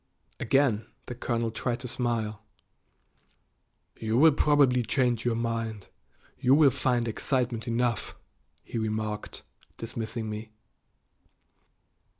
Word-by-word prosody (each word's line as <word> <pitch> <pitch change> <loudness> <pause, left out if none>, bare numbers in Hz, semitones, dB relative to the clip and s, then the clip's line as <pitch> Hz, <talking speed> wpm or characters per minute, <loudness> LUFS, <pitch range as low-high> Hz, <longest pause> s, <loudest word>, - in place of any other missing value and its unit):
Again 115 -4 +2 0.2
the - - -5
colonel 115 -1 -1
tried 120 +2 -2
to 125 - -5
smile. 115 -3 -2 1.6
"You 120 +9 +5
probably 140 -3 +4
will - - +1
change 120 -1 +1
your 120 -2 +2
mind; 115 -3 -3 0.5
you 130 +2 +5
will 145 -3 +6
find 125 -2 0
excitement 120 0 -1
enough," 120 0 0 0.5
he 115 - -4
remarked, 110 -1 -3 0.3
dismissing 115 0 -4
me. 110 0 -6
115 Hz, 105 wpm, -28 LUFS, 110-125 Hz, 1.6 s, will